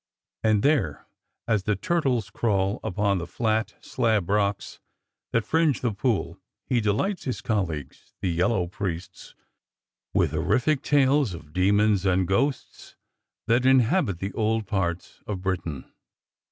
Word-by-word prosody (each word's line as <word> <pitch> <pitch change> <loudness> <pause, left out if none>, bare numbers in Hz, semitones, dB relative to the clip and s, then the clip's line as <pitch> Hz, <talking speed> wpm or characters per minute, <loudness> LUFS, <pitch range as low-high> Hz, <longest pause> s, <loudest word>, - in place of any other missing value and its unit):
And 110 -2 +3
there, 130 - +1 0.4
as 110 -3 +2
the 105 - +1
turtles 130 - 0
crawl 100 -3 0
upon 100 -2 0
the 85 - -5
flat 110 +1 -1
slab 110 -7 0
rocks 100 -1 0 0.5
that 115 -2 +1
fringe 160 +1 +2
the 120 -4 0
pool, 110 +1 -1 0.3
he 120 -2 +1
delights 110 - -1
his 130 - -2
colleagues, 90 - -3
the 95 - -1
yel 85 +3 +2
low 95 -7 0
priests, 90 -1 -6 0.8
with - - +2
horrific 140 +3 +1
tales 140 - +2
of 75 -2 -13
demons 100 +2 +3
and 95 -1 +2
ghosts 135 +9 -2 0.5
that 120 +2 +2
inhabit 130 - +3
the 95 +3 -5
old 110 0 0
parts 95 -4 -3
of 95 -3 -4
Britain. 85 -7 -3
105 Hz, 135 wpm, -25 LUFS, 95-120 Hz, 0.8 s, And